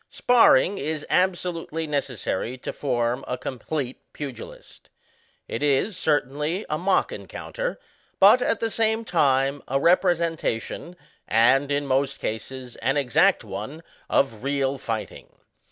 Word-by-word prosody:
Sparring 205 - +4
is 150 +1 -3
absolutely 175 -3 0
necessary 130 -5 -3
to - - -6
form 120 -2 -1
a 125 - -2
com 125 0 -6
plete 135 -2 -3 0.2
pugilist. 140 -5 -9 0.6
It 115 - -4
is, 145 +8 +1
certainly, 150 +3 0
a 150 - +1
mock 185 +1 +2
encounter; - - -5 0.4
but, 210 +6 +7
at 230 - 0
the 225 -1 -1
same 225 +1 0
time, 140 -5 +2
a 135 +1 +1
representation, 170 - 0 0.3
and, 135 +6 +4
in 145 0 0
most 135 +1 0
cases, 125 +3 -6
an 135 +2 0
exact 130 -5 +3
one, 110 +12 -7 0.3
of 115 -6 +1
real 140 -1 0
fighting. 115 -3 -6
145 Hz, 125 wpm, -24 LUFS, 130-175 Hz, 0.6 s, but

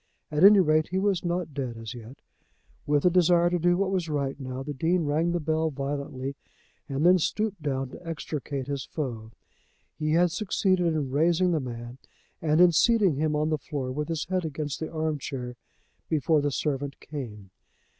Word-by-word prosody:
At 150 +3 +1
any 200 +1 +9
rate, 155 -3 +3
he 185 - -2
was 195 -2 +1
not 175 -3 -2
dead 130 -4 -4
as 115 +1 -7
yet. 120 +2 -11 0.7
With 145 +1 +2
a 180 - +6
desire 175 -1 +4
to 175 - +1
do 175 +1 +3
what 195 0 0
was 180 -4 -1
right 140 -2 -2
now, 130 0 -5
the 145 +1 -5
Dean 165 +5 +1
rang 155 +4 +1
the 175 - 0
bell 160 0 0
violently, 140 -1 -4 0.5
and 140 +3 0
then 180 +1 +6
stooped 205 +2 -1
down 135 -3 -2
to 180 - -11
extricate 145 -4 -4
his 140 -1 -3
foe. 120 -8 -5 0.7
He 155 0 0
had 175 +1 +4
succeeded 185 -2 +1
in 140 -4 -2
raising 170 +5 +3
the 165 - +1
man 120 -1 -7 0.4
and 155 0 +2
in 180 0 +7
seating 200 - +3
him 155 0 0
on 150 +1 +1
the 155 - 0
floor 135 -5 -4
with 150 +3 -3
his 165 -2 -2
head 185 0 -1
against 150 -2 -4
the 160 - -4
arm 155 -2 -1
chair 125 -3 -5 0.5
before 155 0 +2
the 145 - +1
servant 140 0 -2
came. 105 -10 -8
155 Hz, 190 wpm, -27 LUFS, 135-175 Hz, 0.7 s, any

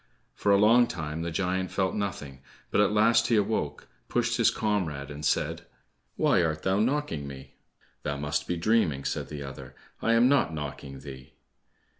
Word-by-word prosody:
For 100 - 0
a 100 - +6
long 115 +4 +5
time 80 -1 -4
the 85 - -2
giant 95 +2 -1
felt 95 -1 0
nothing, 75 -10 -4 0.3
but - - +3
at 105 - +3
last 115 +2 +4
he 115 - +3
awoke, 100 -9 -1 0.2
pushed - - 0
his - - +5
comrade, 85 -10 -2
and 75 +1 -8
said, - - -1 0.5
"Why - - +3
art 80 -2 -1
thou 95 +1 +1
knocking 115 - -1
me?" 70 0 -10 0.5
"Thou 75 -1 -3
must 75 +1 -2
be 90 - -1
dreaming," 85 -7 +1
said - - -2
the 75 -2 -6
other, 70 -1 -9 0.3
"I 115 - +2
am 115 +2 +5
not 135 - +2
knocking 70 -2 -7
thee." 65 -2 -11
85 Hz, 175 wpm, -28 LUFS, 75-105 Hz, 0.5 s, a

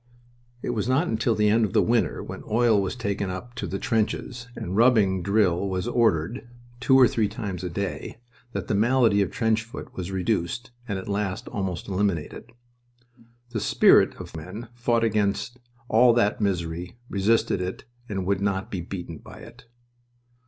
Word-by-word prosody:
It - - -1
was 115 0 -2
not 140 +7 +2
until 110 +1 +1
the 105 0 +2
end 110 +2 +4
of 110 - -1
the 110 - +5
winter, 115 +4 +1
when - - -7
oil 110 -2 +3
was 95 +3 -2
taken 100 -4 -2
up 105 +7 -6
to - - -4
the 95 - -3
trenches 115 +3 -2
and 90 - -4
rubbing 105 -5 +4
drill 100 -1 +2
was 95 +3 -2
ordered, 120 0 +1 0.3
two 130 +1 +5
or 125 - +8
three 110 -2 +1
times 100 -4 -5
a 90 - -2
day, 100 +4 -4 0.4
that - - -4
the - - 0
malady 115 -1 +3
of 100 - +1
trench 110 -1 +1
foot 115 +5 -9
was 90 -1 -5
reduced, 95 +5 -1 0.2
and 100 -4 -2
at 95 - -7
last 100 -2 -2
almost 95 -3 -3
eliminated. 95 -5 -2 1.0
The 115 - -2
spirit - - +5
of - - -9
the 80 - -7
men 95 +9 -8
fought 120 -1 +1
against 105 +2 0 0.3
all 120 +2 +5
that 110 -2 +1
misery, 90 -1 -2
resisted 100 -1 +1
it, 90 +1 -4 0.3
and 95 -3 -2
would 100 0 0
not 100 -1 -1
be 95 - -3
beaten 85 -2 -7
by - - -13
it. - - -14
105 Hz, 175 wpm, -25 LUFS, 95-115 Hz, 1.0 s, or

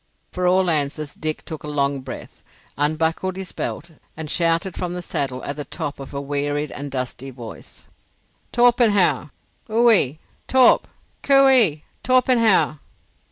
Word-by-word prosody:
For 180 0 -1
all 185 +1 +3
answer 150 0 0
Dick 155 -1 -2
took 160 -2 -7
a - - -7
long 140 -1 0
breath, 130 0 -10 0.3
unbuckled 160 +5 0
his 190 -2 -6
belt, 170 - -5 0.3
and 160 -2 -5
shouted 170 +2 +1
from 180 -1 -4
the 180 - -5
saddle 130 -5 -3
at 140 - -5
the 145 - -4
top 145 0 -5
of 135 - -9
a 140 - -4
wearied 145 +1 -2
and 145 0 -6
dusty 130 0 -5
voice, 120 -4 -11 0.7
"Torpenhow! 215 - +3 0.4
Ohe, 220 - +3 0.3
Torp! 260 -2 +5 0.3
Coo 275 -1 +5
ee, 200 - +3 0.2
Tor 255 0 +3
pen 255 -2 +2
how." 200 -9 +3
155 Hz, 150 wpm, -21 LUFS, 140-190 Hz, 0.7 s, Torp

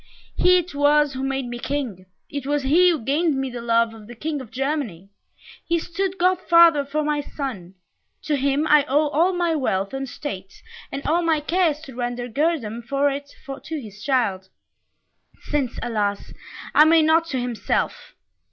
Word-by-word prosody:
He 365 0 +5
it 355 -1 -3
was 290 0 +3
who 260 - -5
made 270 -1 -1
me 240 0 -6
King 240 -10 -4 0.2
it 285 -2 -6
was 290 -1 0
he 340 +7 +5
who 315 -9 -1
gained 300 +3 +1
me 270 -1 -2
the 240 -1 -6
love 230 -1 +2
of 215 -2 -13
the 240 - -10
King 300 +3 -3
of 250 - -11
Germany; 260 - -3 0.6
he 340 - +2
stood 375 +3 -3
godfather 340 -4 +5
for 300 +2 -2
my 295 -1 0
son 230 - -6 0.5
to 305 -1 0
him 280 +2 +1
I 300 -2 +5
owe 295 +3 +2
all 330 +6 +2
my 350 -2 0
wealth 200 -8 -1
and 270 -1 -4
state, 195 -10 -7 0.3
and 275 +1 -5
all 335 +3 +2
my 325 -2 +2
care 345 +4 +2
is 300 0 -5
to 275 -5 -11
render 245 0 -3
guerdon 250 -4 -1
for 280 +4 +1
it 285 +1 -6 0.3
to 320 -1 -4
his 210 -4 -11
child, 205 -9 0 1.0
since, 280 -5 -1
alas! 210 -4 -2 0.4
I 300 - +8
may 320 0 +5
not 320 +2 +4
to 265 -6 -2
himself. 245 - -2
280 Hz, 180 wpm, -23 LUFS, 240-315 Hz, 1.0 s, I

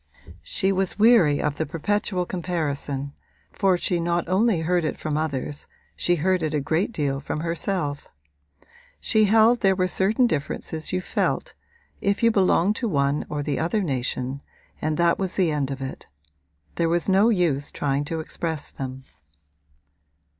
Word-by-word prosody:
She 190 - 0
was 190 -1 0
weary 210 -10 +5
of 150 -1 -1
the 160 - -1
perpetual 190 +2 -1
comparison, 145 -6 -3 0.4
for 190 -2 +2
she 175 0 0
not 170 0 0
only 190 0 +2
heard 175 +1 +1
it 155 - -2
from 155 -1 -3
others 150 -2 -3 0.3
she 175 - +2
heard 185 +3 +1
it 155 -1 -1
a - - +2
great 160 +9 0
deal 140 -8 -1
from 150 - -4
herself. 165 -3 -2 0.9
She 215 -1 +3
held 220 +3 +5
that - - -33
there 195 -3 +4
were 185 -1 +1
certain 205 +7 +2
differences 155 -3 -3
you 185 0 0
felt, - - -1 0.5
if 200 +3 0
you 230 - +6
belonged 195 0 +3
to 240 - -1
one 140 -3 0
or 145 -1 -3
the 145 -2 -2
other 175 +6 0
nation, 130 -2 -2 0.4
and 155 0 -1
that 170 -1 +3
was 190 -2 -2
the 180 -4 +2
end 145 -3 -1
of 135 -1 -4
it: 130 - -7 0.7
there 165 -1 +2
was 170 0 +1
no 195 +4 +4
use 165 -9 +1
trying 140 0 -1
to 160 +1 -3
express 160 -1 -4
them. 130 0 -7
170 Hz, 165 wpm, -24 LUFS, 145-190 Hz, 0.9 s, you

